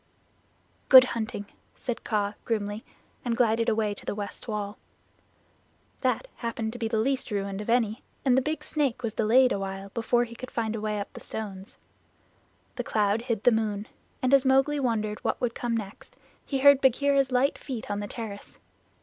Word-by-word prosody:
"Good 260 -1 +11
hunting," 220 -3 -3 0.3
said 245 -2 -4
Kaa 205 -2 0
grimly, 210 -1 -2 0.4
and 235 -2 -1
glided 230 0 +3
away 215 -2 +1
to - - -10
the - - -3
west 205 +3 -6
wall. 210 -2 -4 1.2
That - - 0
happened 230 -1 -3
to 245 - -8
be 225 - -1
the 220 0 -1
least 260 +4 0
ruined 200 -1 -2
of 210 - -7
any, 230 -1 +2 0.2
and 255 -2 +5
the 265 - +4
big 300 +2 -3
snake 275 -6 -1
was 225 -2 -2
delayed 245 +4 +4
awhile 195 0 -3
before 235 +3 +1
he 235 -1 -7
could 255 +2 -8
find 225 -1 -2
a 215 - -4
way 210 -1 -1
up 200 - -6
the - - -9
stones. 200 -3 -7 1.0
The - - -1
cloud 210 0 +1
hid 230 -3 -2
the 245 - +6
moon, 215 -2 -1 0.4
and 255 +1 +2
as 275 -1 +6
Mowgli 270 +2 +3
wondered 215 -5 -1
what - - 0
would 240 -2 -1
come 235 -1 -1
next 205 -2 -8 0.3
he 275 - -1
heard 280 0 +7
Bagheera's 275 +1 +3
light 255 +3 +2
feet 245 -7 -6
on 205 - -1
the 205 - -4
terrace. 210 -2 -7
230 Hz, 185 wpm, -27 LUFS, 210-255 Hz, 1.2 s, Good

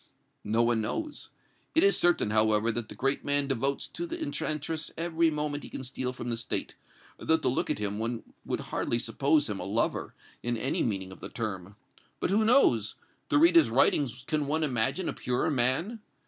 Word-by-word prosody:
"No 110 +3 +1
one 115 -1 +2
knows. 310 - -4 0.5
It 325 - +5
is 400 - +5
certain, 175 -11 +3
however, 110 +1 +3
that 115 -1 -4
the - - -9
great 135 +1 0
man 145 0 +2
devotes 135 +1 -1
to 345 - -4
the 340 +1 -5
enchantress 155 - -2
every 165 0 +1
moment 150 -1 -2
he - - -9
can - - -5
steal 125 0 -2
from 120 -1 -5
the 115 - -1
State, 115 - -2 0.5
though 160 - +2
to 160 - -2
look 125 - 0
at - - 0
him 105 0 -3
one 115 +1 -3 0.2
would - - -3
hardly 115 - 0
suppose 145 +5 +1
him 105 -2 -4
a - - -4
lover, 105 +4 -1 0.3
in 120 0 -1
any 110 - -1
meaning 95 -4 -2
of 95 - -12
the - - -7
term. 100 -5 -5 0.4
But - - -1
who 215 +3 +3
knows? 170 - +3 0.3
To - - +3
read 335 +3 +5
his 335 - +6
writings 130 -2 +2
can 150 -1 -1
one 155 +2 0
imagine 135 +6 0
a - - -2
purer 125 +5 -1
man? 145 - +1
135 Hz, 200 wpm, -28 LUFS, 115-160 Hz, 0.5 s, his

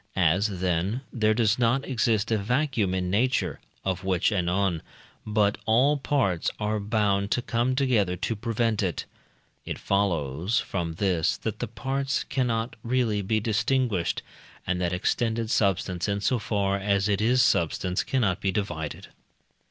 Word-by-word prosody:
As, 95 +3 +2
then, 95 +7 0
there 110 -2 +2
does 115 0 +2
not 125 +3 +2
exist 115 -3 +1
a 110 - +3
vacuum 115 -3 0
in 90 -1 -1
nature 100 - +1 0.3
(of 95 -1 -1
which 95 +2 +1
anon), 90 -2 0 0.5
but 105 -1 +2
all 130 +7 +4
parts 135 - 0
are 105 0 0
bound 100 -1 +1
to 125 - 0
come 120 +2 0
together 115 -9 +2
to 105 +5 -2
prevent 115 0 0
it, 90 -5 -2 0.6
it - - -5
follows 90 - 0
from 85 -4 -3
this 90 -4 +1
that - - -4
the - - -2
parts 135 +1 -2
cannot 120 -2 -1
really 115 -3 0
be 110 +3 0
distinguished, 110 - 0 0.4
and 90 0 -1
that 85 -1 0
extended 115 +5 0
substance 100 -4 +1
in 100 0 0
so 120 +4 +1
far 100 -2 0
as 100 0 +1
it 100 -1 +1
is 125 +3 +4
substance 90 -4 +1
cannot 100 -8 0
be 95 - +1
divided. 85 -6 -4
105 Hz, 150 wpm, -26 LUFS, 95-115 Hz, 0.6 s, all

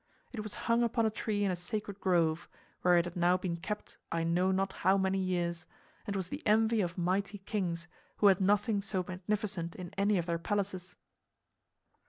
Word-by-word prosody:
It 235 - -5
was 210 -2 -6
hung 230 +1 +3
upon 230 -1 +2
a 220 - +2
tree 210 -1 -1
in 195 - +2
a - - 0
sacred 200 +3 -5
grove, 170 -4 +1 0.3
where 180 -1 +5
it 170 - +3
had 175 - -6
now 175 +1 +3
been 180 -2 -2
kept 210 +5 -6
I 165 0 0
know 175 +3 +2
not 190 0 0
how 190 +2 +3
many 190 0 +1
years, 175 -2 -1 0.4
and 200 - -2
was 190 -2 -2
the 285 - -5
envy 220 +1 +3
of 175 -1 -2
mighty 190 +3 0
kings 185 -4 -3 0.3
who - - +2
had 195 -1 +6
nothing 205 +2 +2
so 190 -2 -2
magnificent 185 -2 -3
in 180 -2 -8
any 200 0 +3
of 170 - 0
their 170 -1 -1
palaces. 190 0 -2
190 Hz, 195 wpm, -32 LUFS, 175-205 Hz, 0.4 s, had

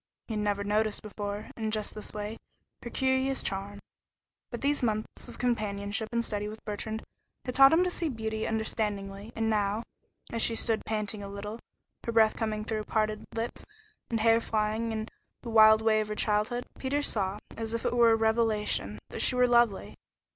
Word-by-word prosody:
He 225 - -4
had 215 - -1
never 205 -1 0
noticed 210 +1 +1
before, 205 0 -5
in 220 -1 -2
just 215 -1 -2
this 215 - -6
way, 210 +1 -5 0.4
her 235 - -6
curious 265 +1 +1
charm, 195 +1 -3 0.7
but 240 - -6
these 285 +1 +2
months 215 -3 -2
of - - -10
companionship 215 -2 -1
and 235 0 0
study 210 -1 -1
with 215 +1 -9
Bertrand 220 +1 -3 0.4
had 250 - -3
taught 270 +1 +8
him 330 +3 +5
to 360 - 0
see 335 -2 -1
beauty 220 -3 -3
understandingly, 210 -2 -2
and 225 0 0
now, 210 0 +1 0.5
as 230 - -1
she 230 - +2
stood 225 -1 +1
panting 215 -1 -2
a 200 - -6
little, 205 +3 -6 0.4
with 230 - -3
breath 220 -1 +5
coming 215 -2 -2
through 215 -1 -2
parted 215 0 0
lips 230 +1 -3 0.5
and 225 -2 0
hair 225 +1 +5
flying 220 +1 0
almost 220 -1 -2
in - - -9 0.4
the 240 - -5
wild 220 0 +7
way 220 -1 +4
of 215 - -3
her 210 - -3
childhood, 215 +4 0
Peter 285 +2 0
saw, 200 -6 0 0.2
as 225 0 -3
if 230 - -4
it - - +1
were 235 -1 +6
a - - +6
revelation, 220 - +1
that - - -4
she 255 - +3
was 250 -1 +4
lovely. 235 -5 +3
220 Hz, 190 wpm, -29 LUFS, 210-230 Hz, 0.7 s, taught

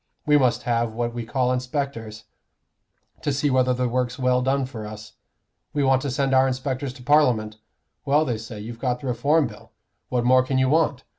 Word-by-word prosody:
We 150 -1 +4
must 130 -4 +2
have 120 -2 0
what 120 +1 -2
we 120 -2 -5
call 125 0 +1
inspectors, 125 -4 -4 1.0
to 145 - -1
see 140 +1 0
whether 130 0 +3
the 125 0 0
work's 125 +1 -1
well 125 -1 +2
done 135 +1 +1
for 115 -5 -7
us. 110 0 -10 0.6
We 145 - +1
want 135 -1 +3
to 140 - -3
send 135 +1 0
our 130 0 +5
inspectors 130 +1 -3
to 130 -2 -13
Parliament. 125 -7 +2 0.5
Well, 150 +2 +2
they 120 -5 -2
say 110 -1 -8
you've 115 +2 -8
got 125 -1 -1
the - - -8
Reform 140 +6 +2
Bill; 110 -4 -10 0.4
what 120 -1 0
more 130 +1 +6
can 130 +1 -1
you 130 0 +3
want? 150 -4 +1
125 Hz, 200 wpm, -24 LUFS, 120-135 Hz, 1.0 s, more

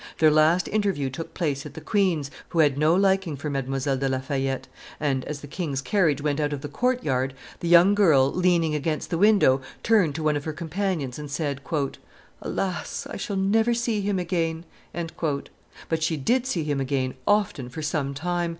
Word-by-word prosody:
Their 155 -1 +5
last 155 +4 +4
interview 195 -11 0
took 160 +5 -7
place 145 -5 -1
at - - -10
the - - -6
queen's, 180 -9 0 0.2
who 170 - -5
had 150 -4 +4
no 155 +4 +3
liking 190 -4 +2
for 145 +2 -4
Mdlle. 135 0 -1
de 135 0 0
La 130 - 0
Fayette; 135 0 -2 0.3
and, 135 -4 0
as 150 -1 -5
the 145 - -9
king's 145 -3 -3
carriage 150 -1 +1
went 150 -1 0
out 150 -1 0
of 140 - -4
the 145 - -5
court 250 - 0
yard, 130 -1 0 0.2
the 170 - -3
young 175 +3 +7
girl, 155 -10 +4
leaning 175 -3 +2
against 150 +1 -2
the 165 - +1
window, 195 -10 +5 0.2
turned 205 -10 +3
to 160 - -3
one 155 -1 +2
of 145 - -3
her 155 - -3
companions 160 -4 -3
and 150 -1 -7
said, 140 -1 -2 0.8
"Alas! 185 -2 -3
I - - -5
shall 200 - -4
never 220 +5 +2
see 230 -3 0
him 200 -1 0
again!" 170 -2 -1 1.2
But 160 -1 -1
she 160 0 0
did 245 - +1
see 175 -11 -1
him 145 -2 -1
again 130 -1 -1
often 190 -11 +1
for 155 +5 -6
some 145 -3 -1
time. 175 +3 -1
155 Hz, 195 wpm, -25 LUFS, 140-185 Hz, 1.2 s, young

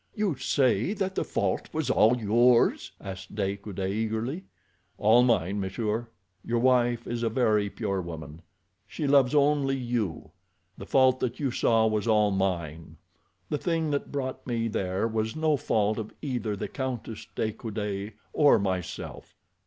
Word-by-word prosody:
"You 210 -7 0
say 130 - +1
that 190 -2 -2
the - - -1
fault 95 -2 -1
was 160 -1 -1
all 115 +3 +4
yours?" 120 +2 +3
asked 95 0 -8
De 100 -1 -1
Coude 100 -1 -7
eagerly. 110 - -2 0.5
"All 110 +3 +5
mine, 105 -5 +2
monsieur. 105 +4 -2 0.4
Your 120 - -1
wife 120 -1 +2
is 120 -1 -3
a 115 - +1
very 110 -4 +2
pure 100 -3 -2
woman. 80 -2 -8 0.5
She 150 - -4
loves 140 -1 +4
only 140 -2 +3
you. 120 -9 -3 0.4
The - - -10
fault 130 -1 +4
that 125 -1 -2
you 140 -4 0
saw 115 -1 +3
was 110 0 0
all 105 -2 +4
mine. 85 -5 -2 0.5
The 150 - -1
thing 165 -3 0
that 140 - -2
brought 130 -2 -4
me 115 -2 -1
there 95 -1 -1
was 110 0 -2
no 155 -1 +2
fault 110 -4 0
of 110 - -6
either 120 -7 -2
the 100 - -4
Countess 125 -5 -5
de 110 - 0
Coude 105 -2 -4 0.2
or 145 -5 +5
myself. 95 -4 -4
115 Hz, 155 wpm, -27 LUFS, 100-130 Hz, 0.5 s, All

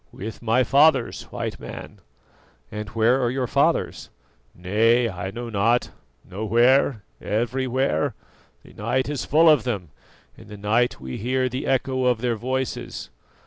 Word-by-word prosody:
"With 110 +3 -8
my 115 +2 +2
fathers, 135 -1 +3
White - - -4
Man." - - -9 0.7
"And 105 0 -6
where 115 +4 +2
are 120 - +1
your 130 +1 -1
fathers?" - - 0 0.5
"Nay, 115 +7 +2
I 95 -2 -5
know 120 +4 -6
not 115 +4 +1 0.4
nowhere, 115 +4 +2 0.2
everywhere: 125 - -1 0.5
the - - -16
night 130 +1 -1
is 145 -2 -3
full 160 +3 +4
of 150 -7 +6
them; 100 -9 -3 0.5
in - - -15
the 105 0 -10
night 110 +4 +1
we 65 -1 -6
hear 130 +4 0
the 130 +2 -4
echo 130 -1 0
of 125 -2 +2
their 120 -2 0
voices. 130 - -4
120 Hz, 145 wpm, -23 LUFS, 105-130 Hz, 0.7 s, of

